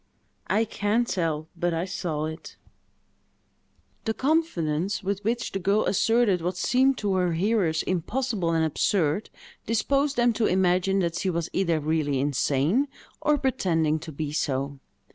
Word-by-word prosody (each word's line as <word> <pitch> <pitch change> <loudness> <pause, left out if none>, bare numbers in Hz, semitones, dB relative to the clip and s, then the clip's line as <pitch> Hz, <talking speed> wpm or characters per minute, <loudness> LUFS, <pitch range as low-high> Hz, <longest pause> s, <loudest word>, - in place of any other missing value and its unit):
"I 220 +2 +2
can't 220 +2 0
tell; 160 -5 -1
but 175 0 -1
I 165 +2 -1
saw 165 -5 -3
it." 160 +1 -8 1.5
The 220 -1 -1
confidence 200 - 0
with 200 +1 -2
which 235 +3 -1
the 195 - -2
girl 200 +3 +2
asserted 225 -2 +2
what 180 +2 -2
seemed 260 +7 +3
to 205 -2 -1
her 180 -2 +1
hearers 175 -3 +1
impossible 200 +1 -1
and 165 -1 +2
absurd, 160 +2 0 0.4
disposed 275 +6 +1
them 240 -1 +3
to 220 0 +1
imagine 185 +1 +2
that 170 -1 -1
she 190 - 0
was 170 -2 -2
either 170 -4 +1
really 150 -2 0
insane, 145 - +1 0.3
or 300 0 +3
pretending 165 - +1
to 160 +1 -8
be 150 0 -4
so. 140 -2 -2
185 Hz, 145 wpm, -26 LUFS, 160-220 Hz, 1.5 s, seemed